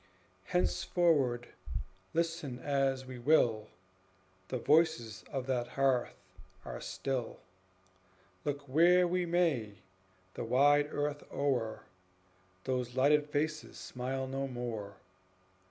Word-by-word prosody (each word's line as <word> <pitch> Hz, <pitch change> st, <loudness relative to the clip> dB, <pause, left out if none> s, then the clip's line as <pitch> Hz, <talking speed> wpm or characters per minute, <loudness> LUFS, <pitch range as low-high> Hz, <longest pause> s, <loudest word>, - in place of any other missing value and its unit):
Henceforward, 165 Hz, -, +1 dB, 0.6 s
listen 165 Hz, -6 st, -1 dB
as 135 Hz, -1 st, 0 dB
we 130 Hz, -1 st, -8 dB
will, 120 Hz, -6 st, +3 dB, 0.8 s
The 130 Hz, -, -2 dB
voices 150 Hz, -6 st, +2 dB
of 135 Hz, -2 st, -2 dB
that 125 Hz, -2 st, -1 dB
hearth 135 Hz, -3 st, +1 dB, 0.5 s
are -, -, -6 dB
still; 130 Hz, -4 st, -3 dB, 1.1 s
Look 145 Hz, -1 st, -2 dB
where 175 Hz, +6 st, +5 dB
we 180 Hz, 0 st, 0 dB
may, 160 Hz, -, +1 dB, 0.6 s
the -, -, -4 dB
wide 145 Hz, +5 st, +4 dB
earth 145 Hz, 0 st, -2 dB
o'er 125 Hz, -6 st, -1 dB, 0.8 s
Those 125 Hz, -1 st, -2 dB
lighted 145 Hz, +3 st, +4 dB
faces 155 Hz, +1 st, -2 dB
smile 130 Hz, +1 st, -4 dB
no 135 Hz, +1 st, -3 dB
more. 115 Hz, -6 st, -5 dB
135 Hz, 100 wpm, -32 LUFS, 125-155 Hz, 1.1 s, where